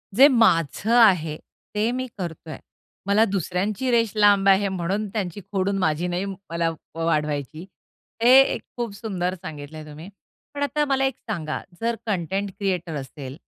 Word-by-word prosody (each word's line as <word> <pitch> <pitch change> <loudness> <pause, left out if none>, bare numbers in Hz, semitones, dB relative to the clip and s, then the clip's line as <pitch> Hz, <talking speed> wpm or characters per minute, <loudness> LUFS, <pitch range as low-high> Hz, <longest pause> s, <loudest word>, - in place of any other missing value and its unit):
जे 270 +5 +9
माझं 225 - +2
आहे 165 -8 +4 0.4
ते 215 +3 +1
मी 255 +1 -3
करतोय. 165 -4 -6 0.5
मला 205 +2 +4
दुसऱ्यांची 195 - -1
रेश 230 -3 +2
लांब 205 -2 +4
आहे 195 +1 +4
म्हणून 190 +3 -2
त्यांची 200 -3 -3
खोडून 195 0 0
माझी 165 0 0
नाही 180 +2 -2
मला 170 -4 -3 0.3
वाढवायची. 155 -1 -1 0.6
हे 240 - +6
एक 270 - 0 0.2
खूप 235 -4 -3
सुंदर 185 -4 -3
सांगितलंय 155 -2 -8
तुम्ही. 155 +5 -10 0.4
पण 285 0 -2
आता 295 +1 0
मला 270 -1 +1
एक 265 -2 -1
सांगा, 160 -7 -3 0.2
जर 230 0 0
कंटेंट 195 0 -2
क्रिएटर 180 -5 -2
असेल, 135 0 -7
190 Hz, 145 wpm, -24 LUFS, 165-215 Hz, 0.6 s, जे